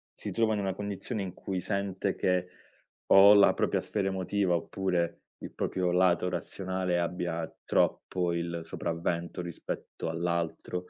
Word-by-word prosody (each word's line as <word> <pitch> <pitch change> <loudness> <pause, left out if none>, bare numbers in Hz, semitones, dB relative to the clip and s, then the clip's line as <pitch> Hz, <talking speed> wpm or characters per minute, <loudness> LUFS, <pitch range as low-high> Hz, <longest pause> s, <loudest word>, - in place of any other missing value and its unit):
si - - -5
trova 115 -1 +2
in 105 - -1
una 95 -1 -1
condizione 105 +2 -4
in 95 -2 -4
cui 95 -1 -4
sente 100 0 -2
che 90 -1 +1 0.6
o 100 +1 +9
la 100 -1 +7
propria - - 0
sfera 100 -2 -2
emotiva 95 -1 0
oppure 85 -1 -1 0.2
il - - -8
proprio 90 -1 -1
lato 90 0 +3
razionale 90 0 -2
abbia 85 -1 -2 0.2
troppo 90 -2 +1
il 85 0 -2
sopravvento 85 +1 -3
rispetto 85 -1 -5
all'altro, 85 +1 -2
90 Hz, 140 wpm, -29 LUFS, 85-95 Hz, 0.6 s, o